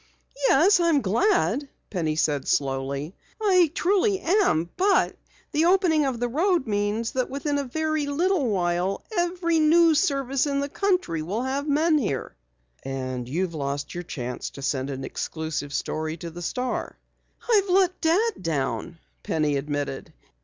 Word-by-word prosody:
"Yes, 360 +7 +5
I'm 335 -5 +3
glad," 280 - +1 0.2
Penny 160 -5 -1
said 145 -3 0
slowly. 140 +3 -1 0.3
"I 370 -6 +4
truly 390 +2 +2
am. 325 - +2
But 390 +2 +2 0.4
the 310 +1 +2
opening 345 -5 +3
of 250 -3 -2
the 245 - 0
road 335 +4 +1
means 210 +1 -1
that 255 -1 -1
within 285 +1 -1
a 280 - -2
very 310 +2 -1
little 325 0 +1
while 180 0 0
every 345 -2 +1
news 320 0 +5
service 275 -5 0
in 280 -1 0
the 280 0 -2
country 365 - 0
will 200 +10 -2
have 275 +3 -2
men 310 +2 +3
here." 140 - -3 0.5
"And 130 -2 -4
you've 170 +4 -1
lost 145 -1 -3
your 175 - -4
chance 125 -6 -5
to 140 - -7
send 135 0 -1
an 135 -1 -5
exclusive 155 0 -4
story 155 +3 -3
to 170 0 -7
the 175 +2 -9
Star." 250 +8 -3 0.5
"I've 410 -5 +3
let 370 0 +2
Dad 380 - +1
down," 165 +1 -2 0.2
Penny 150 -2 0
admitted. 145 -1 -3
255 Hz, 150 wpm, -25 LUFS, -, 0.5 s, Yes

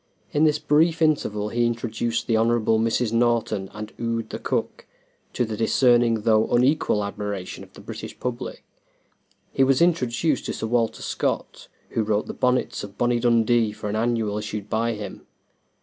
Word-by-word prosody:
In 150 +2 +3
this 150 -1 +3
brief 155 +2 +2
interval 110 -10 +1
he 120 +1 +1
introduced 115 0 -2
the 115 - +1
Hon. 110 +1 +3 0.3
Mrs. 115 0 0
Norton, 115 -4 +1
and 105 0 -8
Ude, 115 -1 -2
the - - -5
cook, - - -3 0.5
to 125 - 0
the 110 -1 -4
discerning 120 0 +3
though 110 0 +3
unequal 125 -4 +2
admiration 100 -2 -5
of - - -17
the - - -13
British - - -8
public. 125 -1 -5 0.9
He 135 - +3
was 135 0 +3
introduced 160 -4 +1
to - - -2
Sir - - -4
Walter 115 0 0
Scott, - - -3 0.2
who 115 - -1
wrote 105 0 0
the - - -6
"Bonnets 125 0 0
of 100 0 -9
Bonnie 120 0 +2
Dundee" 115 -1 +3
for 105 - -5
an 105 - -2
annual 110 -2 0
issued 105 -1 -6
by 115 +1 +1
him. 105 -1 -8
115 Hz, 165 wpm, -24 LUFS, 110-125 Hz, 0.9 s, In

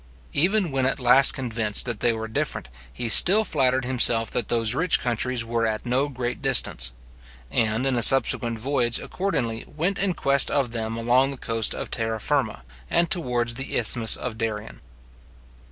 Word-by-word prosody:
Even 185 +2 0
when 135 -1 -1
at 135 - -1
last 130 +2 +4
convinced 115 -5 -2
that 120 -4 -5
they 120 - +1
were 110 -1 -6
different, 110 - -5 0.2
he 120 - -6
still 195 - +7
flattered 130 -6 0
himself 120 -3 +3
that 120 - -3
those 115 -1 +1
rich 165 +6 0
countries 120 0 -2
were 115 0 -2
at 110 +1 -5
no 130 +4 -1
great 125 -1 -6
distance; 125 - +2 0.6
and 115 +3 -1
in 135 -2 -1
a 120 - -1
subsequent 120 -2 +4
voyage, 120 -1 -1
accordingly, 125 -13 -4
went 175 +6 -3
in 190 -3 +1
quest 140 -1 +2
of 135 -4 -2
them 115 -1 -5
along 125 +4 +1
the 140 - -7
coast 115 -2 -3
of - - -7
Terra 115 -1 -3
Firma, 110 - -3 0.3
and 170 0 0
towards 120 -9 -1
the 135 +3 -4
Isthmus 115 0 +3
of 120 -3 -7
Darien. 110 -1 -6
120 Hz, 170 wpm, -22 LUFS, 115-135 Hz, 0.6 s, still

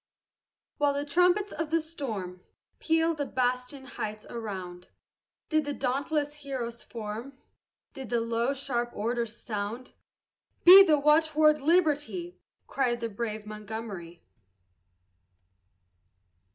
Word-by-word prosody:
While 290 -1 +2
the 285 +1 -2
trumpets 360 +6 +2
of 320 -1 -4
the 330 +1 +2
storm 225 - -6 0.4
Pealed 325 0 +1
the 285 - -1
bastioned 250 +2 -2
heights 215 -4 -6
around, 185 -6 -6 0.6
Did 310 -1 +2
the 290 -1 -4
dauntless 285 +3 -1
heroes 255 -5 -5
form, 230 +4 -7 0.6
Did 265 -4 -8
the 240 - +1
low, 230 +4 0
sharp 240 -3 -2
order 235 +3 -1
sound. 220 +2 -5 0.7
"Be 375 +3 +11
the 310 -5 +4
watchword 305 0 +4
Liberty!" 335 +2 +1 0.3
Cried 245 -3 0
the 230 -1 -3
brave 215 0 -4
Montgomery. 210 -5 -7
260 Hz, 110 wpm, -28 LUFS, 225-300 Hz, 0.7 s, Be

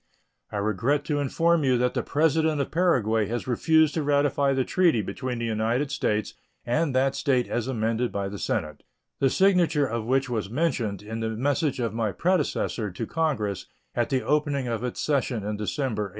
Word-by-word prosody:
I 105 - -3
regret 110 +8 0
to 145 -2 0
inform 165 +4 +2
you 130 -2 +3
that 125 +1 +1
the - - 0
President 155 0 +1
of 140 - -2
Paraguay 115 - +2
has 120 +3 -3
refused 155 +5 +3
to 160 - -1
ratify 145 -1 +2
the 130 -1 +1
treaty 170 - +2
between 130 +3 -4
the 115 - -2
United 115 +5 0
States 105 -6 -1 0.3
and 145 +3 0
that 135 +1 +2
State 130 -5 +1
as 120 0 -2
amended 115 -1 -1
by 100 -1 -2
the 100 0 -6
Senate, 75 -1 -2 0.4
the 135 - +3
signature 175 -4 +3
of 115 -3 -3
which 135 +2 +2
was 110 -5 -3
mentioned 120 - -1
in 110 +2 -5
the 115 0 -1
message 135 +5 0
of 115 -4 -1
my 110 -2 -1
predecessor 165 - 0
to 95 +5 -5
Congress 130 - -1 0.3
at 120 - 0
the 130 -2 0
opening 145 -3 0
of 115 -1 -2
its 125 - -4
session 135 -7 0
in 105 +1 -2
December, 105 +1 -2
1853. - - -7
130 Hz, 190 wpm, -26 LUFS, 110-145 Hz, 0.4 s, you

